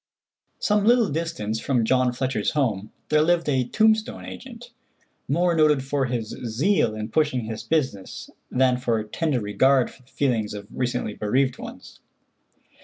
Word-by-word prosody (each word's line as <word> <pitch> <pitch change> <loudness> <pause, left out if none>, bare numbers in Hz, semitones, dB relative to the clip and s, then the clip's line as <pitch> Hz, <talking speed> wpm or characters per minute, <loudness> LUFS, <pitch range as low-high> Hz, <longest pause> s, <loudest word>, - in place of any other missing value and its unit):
Some 210 -1 +1
little 235 0 +4
distance 140 -9 -2
from 125 -3 +1
John 130 +1 +2
Fletcher's 130 +2 -1
home 110 -9 -1 0.2
there 150 0 +4
lived 170 +1 +2
a 130 -4 +1
tombstone 220 - +1
agent, 245 -1 -10 0.6
more 170 +4 +2
noted 150 -4 +3
for 135 0 0
his 120 -3 -3
zeal 120 - 0
in 110 +1 -5
pushing 150 -1 +1
his 110 0 -5
business 115 -6 -2 0.2
than 125 0 +2
for 115 -3 0
tender 135 +5 -1
regard 125 +5 +2
for - - -19
the 125 - -27
feelings 115 -8 -1
of 100 0 -7
recently 125 -4 -2
bereaved 125 +6 0
ones. - - -10
130 Hz, 150 wpm, -24 LUFS, 115-160 Hz, 0.6 s, little